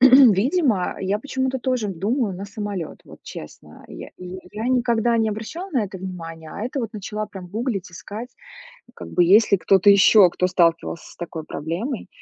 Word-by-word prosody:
видимо, 255 - +5
я 195 +2 0
почему-то 265 0 -2
тоже 250 -4 -1
думаю 205 - -1
на 195 +2 -6
самолёт. 200 -4 -5
Вот, - - -14
честно. 75 - -11
Я - - -9
я 180 +1 -8
я 220 +4 -3
никогда 240 -2 +2
не 220 -1 +2
обращала 275 - -6
на 250 -8 +1
это 190 -1 -8
внимание, 165 -4 -8
а - - -7
это 255 +3 -3
вот 230 0 -4
начала 210 +1 -4
прям 190 -3 -9
гуглить, 210 -2 -3
искать, 210 +7 -8 0.7
как - - -9
бы 180 - +3
есть 205 +5 +5
ли 200 - +6
кто-то 195 +2 +5
ещё, 200 0 +7
кто 180 - 0
сталкивался 170 -2 0
с - - -19
такой 165 -2 -6
проблемой. 185 - -4
205 Hz, 175 wpm, -22 LUFS, 185-240 Hz, 0.7 s, ещё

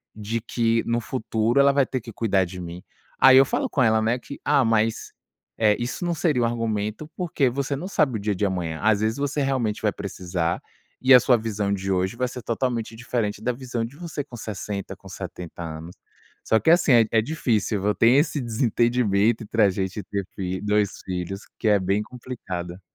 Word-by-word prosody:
de 110 +2 -3
que 115 -1 +1
no 115 0 +1
futuro 115 +1 0
ela 140 0 +5
vai 140 -2 +3
ter 130 -1 -3
que 115 - -9
cuidar 100 -4 +1
de 90 +1 -8
mim." 85 +1 -8 0.4
Aí 130 0 +8
eu 135 - +8
falo - - -1
com 130 - +1
ela, 110 -1 +3
né, 115 +3 +1
que: 140 - -10
"Ah, 140 -4 +4
mas, 115 0 0 0.4
eh, 105 -2 +3
isso 125 +9 -3
não 175 -1 0
seria 150 -7 +1
um - - +3
argumento 115 +3 -2
porque 155 -7 +1
você 140 +2 -2
não 170 +7 -5
sabe 135 - +1
o - - -6
dia 105 -1 -1
de 100 - 0
amanhã. 85 -4 -3
Às 110 -1 +3
vezes 110 +4 0
você 145 +1 -1
realmente 125 -6 0
vai 105 -2 +2
precisar 90 -3 -3 0.4
e 130 0 +6
a 125 - +10
sua 125 0 +4
visão 105 -2 -2
de 95 0 -2
hoje 95 +4 0
vai 125 0 0
ser 125 0 -7
totalmente 115 -1 -2
diferente 115 -3 -2
da 125 - +1
visão 120 -2 -4
de 130 +5 -11
você 165 -4 -5
com 125 - -12
60, 100 -2 -5
com - - -15
70 85 -1 -8
anos." 80 +2 -7 0.5
Só 110 - +3
que, 160 - +4
assim, 170 -6 +5
é 115 -1 +6
é 110 -1 +4
difícil, 110 -7 -1
eu 105 - +3
tenho 115 +6 +5
esse 150 0 0
desentendimento 115 -2 +1
entre 110 +2 -1
a 100 - +5
gente 95 +2 -3
ter 100 +1 -4
fi 95 -1 -3
2 105 -1 0
filhos 95 +2 -4 0.2
que - - -1
é 105 - +5
bem 100 +3 0
complicada. 95 -7 -7
110 Hz, 210 wpm, -24 LUFS, 100-125 Hz, 0.5 s, a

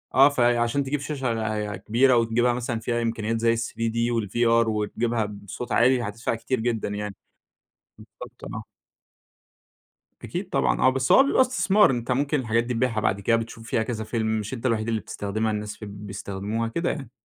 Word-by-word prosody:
آه 135 +2 +8
فعشان 120 0 +2
تجيب 140 +2 -2
شاشة 110 -7 -2
كبيرة، 120 +6 +3
وتجيبها 115 +1 +2
مثلًا 120 -1 -3
فيها 120 +1 -1
إمكانيات 115 -1 -1
زي 115 0 +3
ال3D 115 0 -3 0.2
والVR 115 +2 +2
وتجيبها 110 +2 -1
بصوت 105 +3 -7
عالي 125 +1 +4
هتدفع 115 +2 -3
كتير 125 +2 -2
جدًا 115 -2 -1
يعني، 105 -1 -4 0.8
بالضبط - - -13
آه. - - -5 1.6
أكيد - - -4
طبعًا - - +1
آه، - - +5
بس 130 0 +1
هو - - +8
بيبقى 275 - +2
استثمار، 215 - +4
أنت 125 -1 -1
ممكن 145 +2 +1
الحاجات 115 -1 +1
دي 125 0 -3
تبيعها 115 -2 0
بعد 100 -2 0
كده، 115 +4 +3
بتشوف 115 0 -6
فيها 120 -1 0
كذا 110 -2 -4
فيلم، 110 0 -2
مش 105 +5 -5
أنت 120 +1 -4
الوحيد 115 -2 0
اللي 115 -1 0
بتستخدمها، 110 +2 -3
الناس 105 0 -4
ف - - -9
بيستخدموها، 100 +2 -4
كده 170 +9 -1
يعني. 135 -6 -5
115 Hz, 170 wpm, -25 LUFS, 110-125 Hz, 1.6 s, آه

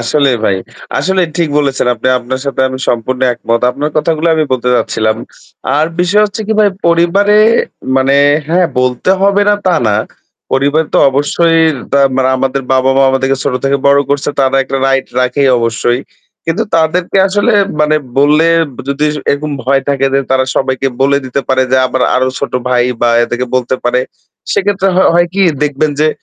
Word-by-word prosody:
আসলে 140 +4 +1 0.2
ভাই, 95 - +1 0.4
আসলে 185 +6 0
ঠিক 170 -3 0
বলেছেন। 140 -3 -1
আপনি 120 +3 -2
আপনার 125 +2 -5
সাথে 140 -1 -3
আমি 130 0 -6
সম্পূর্ণ 125 +2 -2
একমত। 115 -1 -2
আপনার 145 +4 -3
কথাগুলো 160 +1 0
আমি 155 -1 +1
বলতে 125 -1 -1
চাচ্ছিলাম। 110 -2 0 0.6
আর 155 +1 +2
বিষয় 195 +4 +2
হচ্ছে 210 +2 -6
কি 220 - 0
ভাই 205 - +4 0.2
পরিবারে 175 +5 +3 0.6
মানে 135 +1 +2 0.3
হ্যাঁ, 175 +2 +2
বলতে 125 +7 0
হবে 200 +1 +3
না 205 - +4
তা 180 - +3
না। 105 -1 +1 0.6
পরিবার 145 +4 +1
তো - - +4
অবশ্যই 160 +3 +1 0.2
তা 140 - +3 0.2
মানে 130 -1 +1
আমাদের 135 +1 -2
বাবা-মা 130 +1 +2
আমাদেরকে 135 0 0
ছোট 140 - -1
থেকে 135 0 +2
বড় 140 0 +4
করছে। 145 0 -1
তারা 135 0 +2
একটা 135 +1 -4
রাইট 135 0 0
রাখে 125 +3 0 0.2
অবশ্যই। 115 +2 -1 0.5
কিন্তু 165 +7 -1
তাদেরকে 170 +4 0
আসলে 205 +5 +1 0.3
মানে 150 0 +2 0.2
বললে 150 +3 +3 0.4
যদি 140 +2 0 0.2
এরকম 150 +2 -2
ভয় 135 +1 +1
থাকে 135 -1 +1
যে 135 - +3
তারা 130 0 +2
সবাইকে 130 0 0
বলে 140 +1 +2
দিতে 130 +2 -2
পারে 130 0 +2
যে - - +4
আমার 130 0 -2
আরো 130 0 +1
ছোট 140 - -4 0.2
ভাই 125 -1 +2 0.2
বা 120 - +2 0.2
এদেরকে 120 +2 -3
বলতে 130 0 -1
পারে। 125 +1 +1 0.5
সেক্ষেত্রে 195 -1 0
হ - - +3 0.2
হয় 175 0 +3
কি 195 - +1 0.2
দেখবেন 150 +1 0
যে 155 - +3
140 Hz, 175 wpm, -12 LUFS, 130-165 Hz, 0.6 s, ভাই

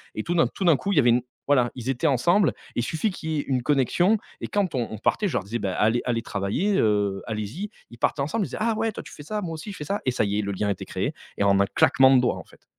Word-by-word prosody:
et 110 - -3
tout 175 - -2
d'un 165 - +4
tout 190 - -5
d'un 165 - +6
coup, 200 - -2
il - - -1
y - - +8
avait 120 -2 +5
une 120 +1 +4 0.3
voilà, 130 -4 +3
ils 125 0 -5
étaient 135 +5 +1
ensemble 165 - +3 0.3
et - - 0
il 120 - +1
suffit 165 - -1
qu'il 160 -3 -6
y 155 - 0
ait - - +1
une 130 -2 0
connexion 150 - +3 0.2
et - - -3
quand 200 -5 0
on 120 -3 0
on 110 - -5
partait, 205 - +1
je - - -4
leur - - 0
disais: 115 +4 -4
«Beh, 100 - -2
allez 110 +3 +2
allez 115 -2 0
travailler, 110 - -1
heu, 100 -3 +1
allez-y», 110 - -4 0.2
ils 120 - -12
partaient 140 - +1
ensemble. 175 +10 -1
Ils - - -6
disaient: - - -6
«Ah 225 0 +1
ouais, 225 0 0
toi, - - -8
tu - - -12
fais 145 - -10
ça, 210 +7 -3
moi 165 -4 -4
aussi, 160 +6 -7
je - - -9
fais 150 - -5
ça» 200 +6 -2
et 130 - +2
ça 110 - +1
y 100 +1 -1
est, - - +2
le 100 -1 -3
lien 100 +1 -1
était 100 - -3
créé - - -2 0.2
et - - +1
en 100 0 +4
un 100 - +4
claquement 135 +6 +5
de 125 - +5
doigts, 125 - +1
en - - -8
fait. - - -22
130 Hz, 320 wpm, -25 LUFS, 110-175 Hz, 0.3 s, y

